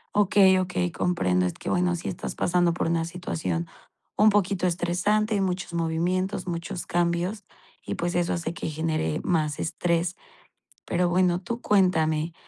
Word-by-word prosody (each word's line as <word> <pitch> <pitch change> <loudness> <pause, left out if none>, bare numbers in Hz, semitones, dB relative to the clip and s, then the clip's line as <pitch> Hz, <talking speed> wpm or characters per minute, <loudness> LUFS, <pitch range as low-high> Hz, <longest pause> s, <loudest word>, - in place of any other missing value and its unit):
Okey, 195 -2 +5
okey, 180 -1 -1
comprendo. 90 - +1
Es 90 - -3
que, - - -5
bueno, 180 0 +2
si 175 - -6
estás 175 - -5
pasando 175 -1 +2
por - - -1
una 165 0 +1
situación 85 - -3 0.5
un 215 0 +6
poquito 195 -2 +1
estresante, 185 +5 +1
muchos 180 -2 -2
movimientos, 180 +4 -1
muchos 170 0 -4
cambios 175 +4 -1 0.4
y, - - -4
pues, 175 +1 -2
eso 175 0 +1
hace 170 -1 -3
que 160 - -4
genere 155 0 -1
más 155 -4 0
estrés, 170 +2 -1 0.7
pero 175 0 +1
bueno, 180 0 +2
tú 235 +3 -4
cuéntame, 165 -6 +2
175 Hz, 150 wpm, -26 LUFS, 165-185 Hz, 0.7 s, un